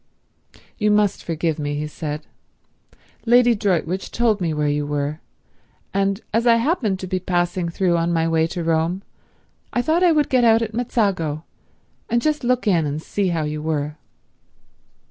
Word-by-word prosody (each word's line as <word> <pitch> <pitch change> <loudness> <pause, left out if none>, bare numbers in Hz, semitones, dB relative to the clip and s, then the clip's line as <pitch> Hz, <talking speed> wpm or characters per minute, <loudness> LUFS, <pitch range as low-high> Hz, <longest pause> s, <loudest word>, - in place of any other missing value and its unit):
"You 210 -1 +2
must 210 -1 +2
forgive 165 -1 -2
me," 145 0 -2
he 150 +1 -2
said. 150 0 -5 1.0
"Lady 240 0 +6
Droitwich 190 -3 -1
told 225 -4 +1
me 170 -2 0
where 150 -1 0
you 145 0 0
were, 145 +1 -2 0.7
and 195 +2 0
as 230 +2 +2
I 230 - +7
happened 230 - +1
to 185 - -5
be 185 0 -1
passing 175 -1 -1
through 175 0 +1
on 170 +1 0
my 165 -1 +1
way 160 0 +2
to 175 0 -4
Rome 165 +3 0 0.7
I 245 - 0
thought 320 +4 +2
I 360 -2 +5
would 300 -2 +2
get 255 -2 +3
out 230 0 +5
at 220 0 -5
Mezzago 195 -10 -1 0.7
and 235 - +2
just 300 +2 0
look 250 0 +1
in 170 -7 +2
and 145 +1 -3
see 195 +4 -2
how 165 -3 0
you 150 0 -3
were." 150 -1 -2
185 Hz, 170 wpm, -21 LUFS, 160-225 Hz, 1.0 s, I